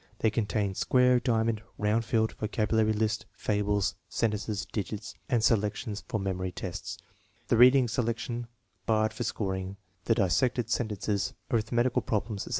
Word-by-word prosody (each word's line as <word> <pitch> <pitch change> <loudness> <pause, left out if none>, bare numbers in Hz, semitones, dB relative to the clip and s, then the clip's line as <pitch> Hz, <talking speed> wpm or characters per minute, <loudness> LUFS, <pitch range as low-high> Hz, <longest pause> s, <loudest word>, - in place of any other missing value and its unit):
They 110 - +2
contain 105 -2 0
square, 125 +4 +4
diamond, 115 -3 +1 0.2
round 105 +2 +1
field, 110 0 +1
vocabulary 110 0 +1
list, 110 +1 -1
fables, 105 -1 0 0.2
sen 115 -2 +1
tences, 105 -1 -3
digits, 105 0 -4 0.2
and 120 -4 +2
selections 105 0 0
for 110 - -1
memory 95 -1 -2
tests, 90 0 -5 0.5
the 115 - +4
reading 125 +1 +7
selection 120 +1 -2 0.4
barred 110 -1 +2
for 120 - -3
scoring, 95 -3 -3 0.3
the 115 - +3
dissected 115 +3 +1
sentences, 105 -4 -1 0.2
arith 115 -2 0
metical 120 +1 +2
problems, 105 -1 -2
etc. - - -7
110 Hz, 145 wpm, -29 LUFS, 105-115 Hz, 0.5 s, reading